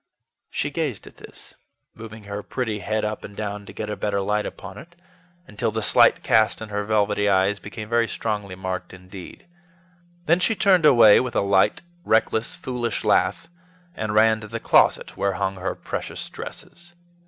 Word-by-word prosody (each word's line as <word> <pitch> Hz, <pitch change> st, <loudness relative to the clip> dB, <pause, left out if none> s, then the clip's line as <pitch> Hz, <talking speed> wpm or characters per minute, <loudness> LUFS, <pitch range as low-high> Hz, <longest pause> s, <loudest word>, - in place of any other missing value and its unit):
She 145 Hz, -, -2 dB
gazed 145 Hz, -8 st, -3 dB
at -, -, -15 dB
this, -, -, -15 dB, 0.4 s
moving 110 Hz, -1 st, -11 dB
her 100 Hz, 0 st, -6 dB
pretty 110 Hz, -2 st, -3 dB
head 110 Hz, +2 st, -2 dB
up 105 Hz, 0 st, -4 dB
and 100 Hz, -, -10 dB
down 105 Hz, -1 st, -5 dB
to -, -, -9 dB
get 110 Hz, -, -6 dB
a 105 Hz, -, -3 dB
better 100 Hz, -1 st, -1 dB
light 105 Hz, +2 st, -1 dB
upon -, -, -9 dB
it, 170 Hz, +6 st, -15 dB, 0.5 s
until 110 Hz, -, -2 dB
the 110 Hz, 0 st, -3 dB
slight -, -, +4 dB
cast 110 Hz, 0 st, +3 dB
in 110 Hz, -, -8 dB
her 105 Hz, 0 st, -2 dB
velvety 105 Hz, -1 st, +1 dB
eyes 95 Hz, +1 st, +2 dB
became 105 Hz, +3 st, -8 dB
very 115 Hz, 0 st, +2 dB
strongly 105 Hz, -5 st, -4 dB
marked 95 Hz, 0 st, -5 dB
indeed. 95 Hz, -, -12 dB, 0.8 s
Then 170 Hz, +2 st, +3 dB
she 220 Hz, +4 st, +1 dB
turned 185 Hz, -6 st, +4 dB
away 115 Hz, -7 st, +7 dB
with 125 Hz, -2 st, -3 dB
a -, -, +3 dB
light, 100 Hz, -1 st, +2 dB, 0.2 s
reckless, 110 Hz, -2 st, +1 dB
foolish 120 Hz, -3 st, -3 dB
laugh, -, -, +1 dB, 0.5 s
and 110 Hz, -10 st, -3 dB
ran 110 Hz, 0 st, +4 dB
to 105 Hz, -, -8 dB
the 115 Hz, +1 st, -5 dB
closet -, -, +3 dB
where 100 Hz, -1 st, 0 dB
hung 95 Hz, 0 st, -2 dB
her 95 Hz, +1 st, -3 dB
precious -, -, -6 dB
dresses. 175 Hz, 0 st, -11 dB
105 Hz, 175 wpm, -23 LUFS, 100-115 Hz, 0.8 s, away